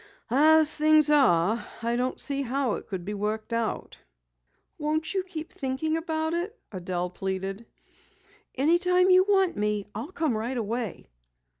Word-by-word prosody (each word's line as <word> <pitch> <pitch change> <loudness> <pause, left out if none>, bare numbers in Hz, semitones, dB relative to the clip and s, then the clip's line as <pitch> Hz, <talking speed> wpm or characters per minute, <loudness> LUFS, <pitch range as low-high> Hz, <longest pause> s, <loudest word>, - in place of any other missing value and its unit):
"As 310 +3 +5
things 310 0 +4
are, 220 - +3 0.2
I 235 +1 0
don't 250 +1 -2
see 280 -1 0
how 265 -2 -1
it - - -6
could 185 -3 -5
be 205 - -4
worked 215 +3 -3
out." 230 -1 -3 0.8
"Won't 310 +3 -1
you 385 - +1
keep 330 -4 -8
thinking 270 +4 -2
about 320 -1 -2
it?" 365 +7 -3
Adelle 180 -2 -3
pleaded. 195 +3 -4 0.9
"Anytime 360 +6 +3
you 370 0 +7
want 385 -3 +3
me, 210 -1 -1
I'll 230 - -6
come 315 -9 -1
right 235 +4 -3
away." 225 -2 -3
265 Hz, 145 wpm, -26 LUFS, 210-315 Hz, 0.9 s, you